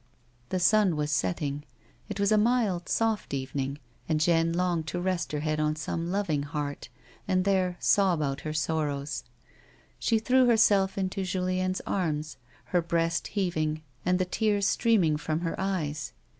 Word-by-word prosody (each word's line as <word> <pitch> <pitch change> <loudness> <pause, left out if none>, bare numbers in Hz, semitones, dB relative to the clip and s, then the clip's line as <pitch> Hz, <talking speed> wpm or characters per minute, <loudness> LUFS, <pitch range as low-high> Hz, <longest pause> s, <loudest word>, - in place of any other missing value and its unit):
The 185 - -1
sun 200 -1 +4
was 150 0 -1
setting; 140 +5 -1 0.5
it 205 -1 -5
was 200 +1 +2
a - - +6
mild, 215 -6 +1
soft 220 -9 0
evening, 135 +1 -3 0.3
and 155 -1 +2
Jeanne 165 +1 +3
longed 170 -2 0
to 175 - -3
rest 180 -1 -1
her 150 -1 -2
head 155 0 -1
on 155 0 +1
some 165 +2 -3
loving 185 -7 0
heart, 145 -3 -4 0.4
and 185 0 +1
there 185 -2 +1
sob 190 -5 +3
out 140 -2 -2
her 155 - -4
sorrows. 150 -2 -2 0.8
She 230 - +2
threw 255 +3 +3
herself 205 -5 +4
into 190 0 -1
Julien's 185 0 -1
arms, 155 -6 -2 0.4
her 175 - +4
breast 165 -1 0
heaving, 155 -6 -1 0.2
and 180 0 +2
the 185 - +1
tears 205 +2 +1
streaming 195 -9 +3
from 155 +1 -2
her 170 -1 -1
eyes. 155 -8 -2
175 Hz, 155 wpm, -28 LUFS, 155-195 Hz, 0.8 s, a